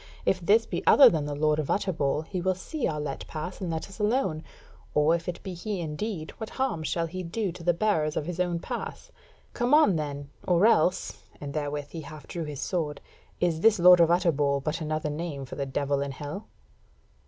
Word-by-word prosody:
If 185 - +2
this 210 +6 +3
be - - -3
other 270 -3 +9
than 155 -4 -1
the 145 0 -3
Lord 150 +1 +2
of 150 - -3
Utterbol, 155 -7 0
he 180 +2 -4
will 185 +1 +1
see 285 - -3
our 150 - -2
let 145 -2 -5
pass 165 +5 -6
and 180 - -2
let 160 -1 -3
us 195 +2 -13
alone; 210 -7 0 0.5
or 150 +2 +4
if 170 +1 -2
it 175 - -6
be 190 -2 -5
he 190 +3 -4
indeed, 160 +2 -4
what 220 - -5
harm 260 -11 -1
shall 165 +1 -1
he 185 +3 -5
do 185 +3 -2
to 170 0 -11
the 175 - +4
bearers 165 -6 +1
of 145 - -1
his 180 +1 -5
own 175 -1 +1
pass? - - -6 0.4
Come 245 +4 +3
on 205 - +5
then, 145 -2 -5 0.2
or 180 +2 +4
else 180 -5 +2 0.2
(and 140 -1 -6
therewith 145 -1 -3
he 165 - -6
half 150 0 -10
drew 170 -2 -5
his 145 -2 -6
sword) 155 -5 -2 0.4
is 165 -2 +1
this 225 +1 +5
Lord 180 0 +8
of 165 -1 +5
Utterbol 150 -5 +2
but 155 +4 -2
another 155 -1 -2
name 150 -3 -4
for 130 - -10
the 140 -1 -3
Devil 140 +1 -1
in 140 -1 -3
Hell?" 145 +9 -7
165 Hz, 215 wpm, -27 LUFS, 150-185 Hz, 0.5 s, other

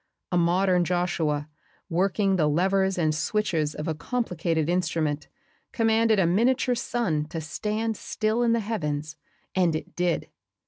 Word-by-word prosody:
A 180 - +2
modern 180 +1 +3
Joshua, 170 -4 0 0.4
working 195 +2 +1
the 160 -5 +2
levers 190 +5 +2
and 155 -3 +2
switches 155 -1 0
of 150 - -5
a 160 - 0
complicated 165 - -1
instrument, 160 -4 0 0.5
commanded 225 -1 +3
a 190 - +4
miniature 245 +8 +2
sun 215 -11 -1
to 165 +2 -5
stand 215 +8 -2
still 215 +3 -1
in 235 -1 +3
the 230 - +1
heavens 155 -8 -3 0.4
and 175 -4 +2
it 155 - -6
did. 175 -1 -1
180 Hz, 140 wpm, -26 LUFS, 155-215 Hz, 0.5 s, a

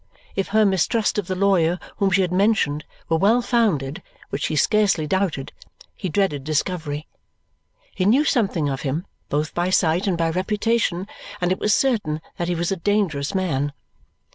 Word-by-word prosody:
If 195 - -1
her 215 +1 +3
mistrust 205 +3 +1
of 195 - -4
the 185 - -2
lawyer 180 -3 +2 0.2
whom 200 -3 +2
she 190 +1 +3
had 180 - -2
mentioned 185 -7 +1 0.2
were 165 0 +1
well 220 +6 +4
founded, 185 - +1 0.3
which - - -1
he - - -2
scarcely 200 -2 +2
doubted, 170 -5 -1 0.4
he 190 - -4
dreaded 155 -5 0
discovery. 155 0 -2 0.9
He 185 - -1
knew 260 +9 +4
something 195 - +1
of 135 -1 -2
him, 150 +6 -2 0.2
both 150 +2 -1
by 175 +1 0
sight 175 +1 +2
and 180 -3 +1
by 165 -1 +1
reputation, 200 0 0 0.3
and 180 0 0
it 185 - 0
was 210 0 +3
certain 210 - +1 0.2
that 170 - -2
he 175 - 0
was 170 +2 -1
a 195 - 0
dangerous 180 -5 0
man. 145 -7 0
180 Hz, 170 wpm, -22 LUFS, 155-200 Hz, 0.9 s, well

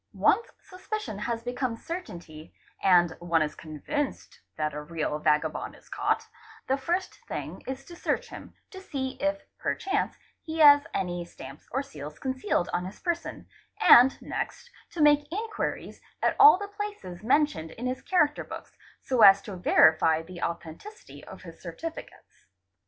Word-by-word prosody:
Once 465 - +3 0.2
suspicion 370 - -6
has 230 +1 -3
become 245 -1 -2
certainty 175 - -8 0.3
and 175 -3 +4
one 170 -2 +2
is 150 - -4
convinced 210 - -5 0.2
that 155 -1 -1
a 150 - -5
real 150 -1 -3
vagabond 150 0 0
is - - -20
caught, - - -1 0.4
the 265 - +1
first 340 +8 -2
thing - - -6
is 265 +1 -5
to 345 - -11
search - - -2
him, - - -11 0.2
to 380 -2 -9
see 270 -8 -3
if 295 +1 0 0.2
perchance 400 +2 -1 0.3
he 320 -1 -6
has 290 -2 +7
any: 175 -2 -2
stamps 135 -4 -12
or 270 +3 -1
seals 150 - -9
concealed 260 -7 -1
on 180 - -1
his 190 - -9
person, 345 -1 -3 0.3
and 250 +3 +7
next 485 - -5 0.2
to 325 - -1
make 295 0 +4
inquiries 425 +3 -4 0.2
at - - +2
all 430 -2 +9
the 405 +1 -5
places 410 - -7
mentioned 220 - +1
in 235 +9 -8
his 255 +1 -2
character 300 -5 +1
books, - - -9 0.3
so 255 -3 0
as 195 -1 +9
to 200 -1 -8
verify 160 -2 +4
the 175 +1 -10
authen 170 -1 -4
ticity 430 +1 -12
of - - -12
his - - -12
certificates. 330 0 -9
255 Hz, 155 wpm, -27 LUFS, -, 0.4 s, all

